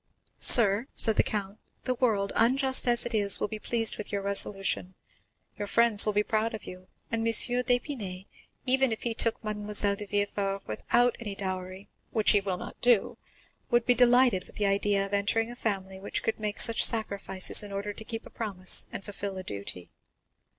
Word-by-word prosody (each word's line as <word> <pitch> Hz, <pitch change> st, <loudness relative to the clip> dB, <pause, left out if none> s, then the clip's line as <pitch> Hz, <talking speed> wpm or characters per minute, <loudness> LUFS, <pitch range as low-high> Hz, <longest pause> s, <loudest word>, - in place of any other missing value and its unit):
"Sir," 225 Hz, +1 st, +4 dB
said 220 Hz, -, +3 dB
the -, -, +5 dB
count, 205 Hz, -1 st, -5 dB, 0.2 s
"the 255 Hz, -, -1 dB
world, 220 Hz, -6 st, -1 dB
unjust 260 Hz, +3 st, +2 dB
as 240 Hz, 0 st, +3 dB
it 240 Hz, -, -3 dB
is, 205 Hz, -2 st, +2 dB
will -, -, -2 dB
be 215 Hz, 0 st, -8 dB
pleased 225 Hz, 0 st, +1 dB
with 210 Hz, -, -6 dB
your 200 Hz, -1 st, -4 dB
resolution; 195 Hz, -2 st, -2 dB, 0.6 s
your 205 Hz, -, -4 dB
friends 230 Hz, -1 st, +5 dB
will 210 Hz, -, 0 dB
be 210 Hz, +1 st, +1 dB
proud 220 Hz, +2 st, -2 dB
of 215 Hz, -, -11 dB
you, 185 Hz, 0 st, -12 dB, 0.2 s
and 230 Hz, -, -2 dB
M. 225 Hz, -, -3 dB
d'Épinay, 245 Hz, -5 st, +2 dB, 0.4 s
even 265 Hz, -1 st, +2 dB
if 220 Hz, -, -5 dB
he 235 Hz, -, -2 dB
took 230 Hz, 0 st, 0 dB
Mademoiselle 210 Hz, -1 st, 0 dB
de 205 Hz, 0 st, -9 dB
Villefort 200 Hz, -1 st, -3 dB
without 240 Hz, -, 0 dB
any 210 Hz, -4 st, -7 dB
dowry, 185 Hz, 0 st, -7 dB, 0.2 s
which 215 Hz, -2 st, +2 dB
he 205 Hz, -, +2 dB
will 190 Hz, -2 st, -4 dB
not -, -, -11 dB
do, 240 Hz, -4 st, +1 dB, 0.5 s
would 240 Hz, -2 st, +1 dB
be 250 Hz, -, +3 dB
delighted 245 Hz, -5 st, +3 dB
with -, -, -16 dB
the 210 Hz, -, -2 dB
idea 200 Hz, 0 st, 0 dB
of 200 Hz, -, -10 dB
entering 225 Hz, +3 st, -1 dB
a -, -, -10 dB
family 195 Hz, -5 st, -4 dB
which 195 Hz, -, -4 dB
could 225 Hz, -, -3 dB
make 210 Hz, -1 st, -5 dB
such 230 Hz, -, +4 dB
sacrifices 200 Hz, -4 st, +4 dB
in 205 Hz, -1 st, -7 dB
order 200 Hz, +1 st, -5 dB
to 220 Hz, -, -10 dB
keep 225 Hz, 0 st, -7 dB
a -, -, -14 dB
promise 190 Hz, -5 st, 0 dB
and -, -, -8 dB
fulfil 200 Hz, -1 st, -7 dB
a 185 Hz, -, -7 dB
duty." 100 Hz, -, -7 dB
210 Hz, 190 wpm, -27 LUFS, 195-230 Hz, 0.6 s, the